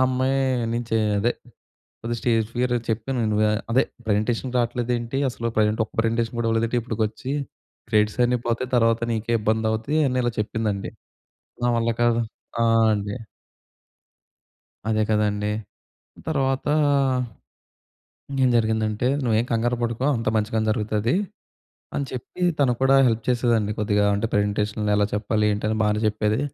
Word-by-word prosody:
అమ్మాయి 130 +1 +1 0.4
నుంచి 115 -1 -1 0.2
అదే 120 +4 +2 0.7
కొద్ది‌‌‌‌‌గా 120 +1 -2
స్టేజ్ 115 -3 +2
ఫియర్ 125 0 +1 0.2
చెప్పానువా. 110 -2 0 0.2
అదే 130 - +5 0.2
ప్రెజెంటేషన్‌కి 115 +4 0
రాట్లేదేంటి, 120 +1 -1
అసలు 115 -1 -3
ప్రెజెంట్ 110 +1 +2
ఒక్క - - -19
ప్రెజెంటేషన్ 115 +1 -1
కూడా 115 - 0
ఇవ్వలేదేంటి 115 +2 +1
ఇప్పటికి 110 -1 -3
వచ్చి. 130 +5 -6 0.6
క్రెడిట్స్ 105 +2 +2
అన్నీ 125 +1 +2
పోతాయి 120 +2 -1
తర్వాత 115 -1 +3
నీకే 115 +1 -2
ఇబ్బంది 110 +1 +1
అవుతాయి 135 +8 0
అని 130 0 -1
ఇలా 120 - 0
చెప్పిందండి. 105 -2 -2 0.8
నా - - +3
వల్ల 115 0 +1
కాదు. 120 0 +3 0.4
ఆ! - - +3 0.3
అండి. 100 +1 -3 1.7
అదే 110 0 +2
కదండీ! 105 -1 +1 0.8
తర్వాతా 135 -1 0 1.6
ఇంకేం 135 -2 +2
జరిగిందంటే 110 0 0 0.2
"నువ్వేం 115 0 +2
కంగారు 120 +2 +1
పడకు. 120 +2 -1
అంత 115 -1 -2
మంచిగానే 110 +1 0
జరుగుతది", 110 +3 0 0.8
అని 140 - -1
చెప్పి 130 +8 -7 0.2
తను 135 -4 +3
కూడా 135 +1 +5
హెల్ప్ 115 -1 0
చేసేదండి. 115 -4 +2
కొద్దిగా 105 0 +2
అంటే 105 +2 -1
"ప్రజెంటేషన్‌లో 105 +1 0
ఎలా 105 - +3
చెప్పాలి?" 105 +1 0
ఏంటి 105 +1 -2
అని, 110 - 0
బానే 105 +1 +1
చెప్పేది. 105 +3 0
115 Hz, 135 wpm, -24 LUFS, 105-120 Hz, 1.7 s, అదే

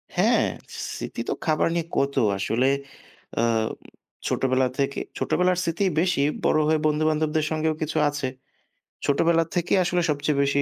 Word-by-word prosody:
হ্যাঁ, - - +3 0.5
স্মৃতি - - -5
তো - - +1
খাবার 155 0 +2
নিয়ে 165 -1 0
কত। 140 +1 +1 0.2
আসলে 120 +6 +1 0.7
এ্যা 115 - +3 0.8
ছোটবেলা 130 0 +2
থেকে, 140 0 0 0.2
ছোটবেলার 180 0 +1
স্মৃতি 170 +3 -1 0.2
বেশি 180 -5 +2 0.2
বড় 155 - +4
হয়ে 155 0 +3
বন্ধুবান্ধবদের 155 0 +1
সঙ্গেও 155 0 0
কিছু 155 - -2
আছে। 145 -2 -3 0.8
ছোটবেলা 165 +4 +3
থেকেই 175 +2 +2
আসলে 175 0 +1
সবচেয়ে 145 -1 0
বেশি, 140 0 +2
155 Hz, 135 wpm, -24 LUFS, 140-165 Hz, 0.8 s, বড়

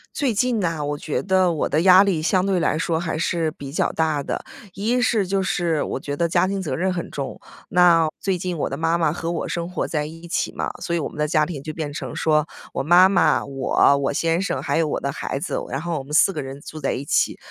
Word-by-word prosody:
最 275 -6 0
近 235 +2 +1
呢， 165 -5 -1
我 145 0 -2
觉 150 - -2
得 185 -2 +2
我 155 - -1
的 155 - +2
压 185 +1 +8
力 190 -6 0
相 185 +3 +2
对 190 -2 +1
来 155 - +1
说 165 0 0
还 165 -2 -3
是 165 -1 0
比 140 -3 -9
较 - - 0
大 155 -3 0
的。 - - -4 0.3
一 225 +6 0
是 220 -5 +2
就 195 +1 0
是 170 -4 0
我 - - -3
觉 145 0 -5
得 170 - +1
家 175 +2 +2
庭 195 0 -2
责 170 - -3
任 185 +3 0
很 170 -2 -4
重， 140 -2 -5 0.3
那 170 -2 +5
最 190 -2 -1
近 180 -1 -3
我 - - -1
的 - - -3
妈 165 +1 +1
妈 165 -3 +1
和 165 0 -3
我 170 - -3
生 170 0 -3
活 180 - -2
在 150 -2 -1
一 165 +2 -10
起 170 - -1
嘛， - - -3
所 170 - -2
以 - - 0
我 155 - -2
们 - - -13
的 150 - +1
家 155 -1 +2
庭 150 -4 -6
就 155 +2 -6
变 150 -2 -4
成 - - -6
说 155 -1 +2 0.3
我 - - -1
妈 175 +5 +7
妈， 190 -1 +2
我， 135 +1 +2
我 140 -1 0
先 165 +4 0
生， 195 - -2
还 - - -1
有 165 -1 +2
我 - - -1
的 140 - -2
孩 135 - -4
子， - - -3
然 135 - -2
后 170 -1 -2
我 - - -7
们 140 - -13
4 195 +5 +5
个 - - -3
人 135 0 -7
住 155 +2 -9
在 135 - 0
一 140 - -5
起。 - - +1
165 Hz, 280 characters per minute, -22 LUFS, 150-180 Hz, 0.3 s, 压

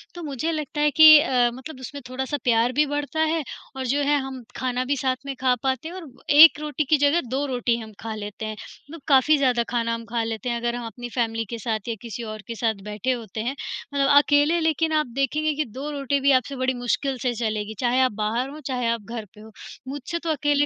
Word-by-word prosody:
तो 345 - -7
मुझे 300 +2 -2
लगता 305 -2 -3
है 295 0 +3
कि 310 +1 +10
अ, 250 -5 +2
मतलब 260 +2 -9
उसमें 280 +3 -8
थोड़ा-सा 265 +3 -3
प्यार 235 -1 +3
भी 300 +3 +3
बढ़ता 290 +2 -3
है 315 0 +1 0.3
और 265 -1 -4
जो 280 +4 +1
है, 290 +1 +3
हम 265 -2 -6
खाना 255 -1 -1
भी 280 +2 0
साथ 260 0 0
में 275 -1 -4
खा 255 -1 +4
पाते 265 +3 -1
हैं 345 - -8
और 345 -6 -8 0.2
1 300 +1 +8
रोटी 300 0 -2
की 310 - +5
जगह, 290 +4 +3
2 265 +4 -1
रोटी 245 -3 0
हम 220 -2 -9
खा 225 -1 -5
लेते 210 0 -6
हैं। 215 0 -4 0.4
तो 330 - -8
काफ़ी 285 +2 +5
ज़्यादा 250 -4 +2
खाना 230 -1 0
हम 230 0 -5
खा 230 0 -2
लेते 225 +2 -4
हैं, 235 - -1
अगर 235 0 -2
हम 240 -1 -5
अपनी 240 +3 -8
फ़ैमिली 225 -2 -1
के 235 - -4
साथ 220 0 -3
या 230 - -2
किसी 235 0 -6
और 215 - -9
के 230 - -5
साथ 225 -1 0
बैठे 210 +5 -2
होते 225 -3 -4
हैं। 255 +4 -2 0.4
मतलब 280 -1 +2
अकेले 290 +3 +4
लेकिन 320 0 +1
आप 305 -1 +2
देखेंगे 270 +3 -1 0.2
कि 305 +1 -1
2 260 +6 -7
रोटी 280 -1 -1
भी 280 +1 +3
आपसे 260 +1 +1
बड़ी 260 0 0
मुश्किल 245 +2 -1
से 250 -2 0
चलेगी, 215 -2 -2
चाहे 250 +1 +2
आप 255 -2 +3
बाहर 220 +5 -2
हों, 300 - -9
चाहे 250 -3 -1
आप 230 -1 -1
घर 225 +1 -7
पे 210 - -15
हों। 220 +1 -13 0.4
मुझसे 285 +5 -4
तो 335 - -5
अकेले 290 -1 +2
260 Hz, 240 wpm, -24 LUFS, 235-290 Hz, 0.4 s, कि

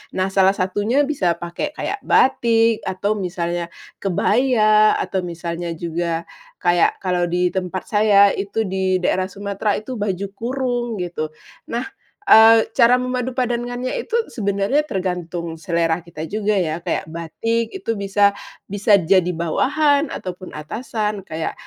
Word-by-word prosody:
Nah, 190 +1 0
salah 195 0 +4
satunya 205 +9 +1
bisa 195 - 0
pakai 175 - -5
kayak 410 - -3
batik, 230 -3 +3
atau 200 +3 -1
misalnya 175 -2 -3 0.3
kebaya, 215 +2 +3
atau 190 - -2
misalnya 170 -1 -4
juga 170 0 -3 0.4
kayak 175 +2 +2
kalau 180 -1 +1
di 180 +1 +1
tempat 185 0 -3
saya 205 -1 +5
itu 200 +3 -2
di 190 -1 -1
daerah 185 +1 +1
Sumatera 200 +1 -2
itu 220 +2 -6
baju 200 -1 -2
kurung, 245 +2 -2 0.2
gitu. 170 -3 -4 0.4
Nah, 235 +1 -2 0.4
eee, 225 - +7
cara 235 +1 +5
memadupadankannya 250 -1 -2
itu 465 0 -2 0.2
sebenarnya 200 +6 +1
tergantung 175 -3 -4
selera 170 -1 0
kita 160 -2 -8
juga 210 +2 -1
ya, 165 -2 -1
kayak 175 - -2
batik 170 +9 -2
itu 355 -12 -3
bisa 200 0 +2 0.3
bisa 205 +1 +3
jadi 180 0 +2
bawahan 280 - +1
ataupun 185 -1 -7
atasan 210 - -3
kayak 160 -3 -4
195 Hz, 130 wpm, -20 LUFS, 175-230 Hz, 0.4 s, eee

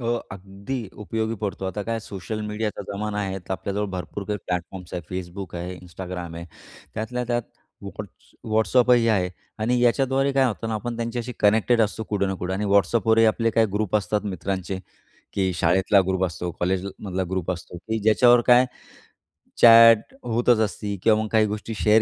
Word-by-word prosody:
हो, 120 0 0 0.2
अगदी 100 +6 -6 0.2
उपयोगी 110 +3 -2
पडतं. 100 -2 -3
आता 100 +2 -3
काय 115 +2 -2
सोशल 105 +1 -6
मीडियाचा 105 -1 -3
जमाना 105 +1 -3
आहे, 95 -1 -3
तर 90 - -7
आपल्याजवळ 100 +2 -2
भरपूर 95 +2 -5
काही 105 -1 -2
प्लॅटफॉर्म्स 90 0 -4
आहेत. 90 - -3
Facebook 90 0 -6
आहे, 90 +2 -5
Instagram 90 -1 -7
आहे, 85 - -7 0.5
त्यातल्या 125 +3 -3
त्यात 120 0 -1 0.4
Whats - - -10 0.2
WhatsApp 120 +3 +3
ही 115 -1 +3
आहे. 95 -5 +2 0.3
आणि 120 +3 +1
याच्याद्वारे 135 +3 +2
काय 135 -1 +3
होतं 115 -2 -2
ना, 110 - -2
आपण 115 +2 -4
त्यांच्याशी 120 +1 -3
कनेक्टेड 110 +3 +3
असतो 110 0 0
कुठं 100 -2 0
ना 95 - -1
कुठे. 90 +1 -2
आणि 100 +2 -2
WhatsAppवरही 110 +2 +4
आपले 115 +1 +2
काही 115 0 +3
ग्रुप 105 -1 +1
असतात 105 +1 -1
मित्रांचे 95 +1 -3 0.5
की 95 -2 0
शाळेतला 95 +4 +3
ग्रुप 95 0 +1
असतो, 90 0 -3
कॉलेजला 95 +2 0 0.2
मधला 95 0 -2
ग्रुप 95 -2 -2
असतो 90 0 -6
की 110 +5 -3
ज्याच्यावर 120 +3 +5
काय 125 0 +7 1.0
चॅट 115 - +8
होतच 120 0 +2
असते 100 +2 -5
किंवा 110 -1 +4
मग 110 - -3
काही 110 -1 +4
गोष्टी 105 +2 -4
शेअर 110 +3 +5
105 Hz, 175 wpm, -24 LUFS, 95-115 Hz, 1.0 s, चॅट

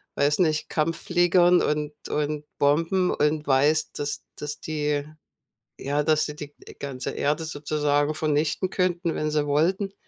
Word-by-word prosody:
weiß 145 +3 +2
nicht, 155 -3 +1
Kampffliegern 175 +2 +3
und 150 0 -1 0.2
und 150 0 -2
Bomben 165 +6 +2
und 150 0 0
weißt, 145 +3 +2
dass 145 0 -3
dass 150 0 -5
die 150 -2 -1 0.8
ja, 145 +2 0
dass 155 0 +2
die 150 - -6
die 150 -1 -9
die - - -11
ganze 135 -3 -4
Erde 150 +3 -1
sozusagen 145 -1 0
vernichten 155 +4 0
könnten, 180 -3 0
wenn 155 0 -1
sie 150 -1 +1
wollten. 185 +7 +1
150 Hz, 145 wpm, -25 LUFS, 145-165 Hz, 0.8 s, Kampffliegern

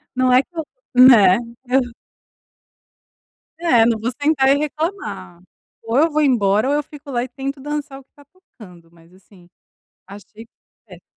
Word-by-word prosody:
Não 255 0 +1
é 255 +1 +5
que - - -23
eu 320 - -2 0.3
né? 230 -8 +7 0.3
Eu 260 +2 +2 1.8
É, 245 -10 +3
não 230 -2 0
vou 230 +3 -3
sentar 285 -3 +2
e 275 - +4
reclamar. 305 - -5 0.4
Ou 225 +2 -2
eu 320 +3 +3
vou 305 +1 0
embora, 220 -4 +1
ou - - +1
eu 295 - -1
fico 290 -1 -13
lá 240 -2 -1
e 255 - -6
tento 275 +2 -6
dançar 290 -1 -6
o - - -18
que - - -52
tá 285 - -19
tocando. 205 - -18
Mas 170 +1 -23
assim, 185 -2 -22 0.6
achei 205 +3 -14 0.4
péssimo. - - -15
255 Hz, 165 wpm, -19 LUFS, 210-290 Hz, 1.8 s, né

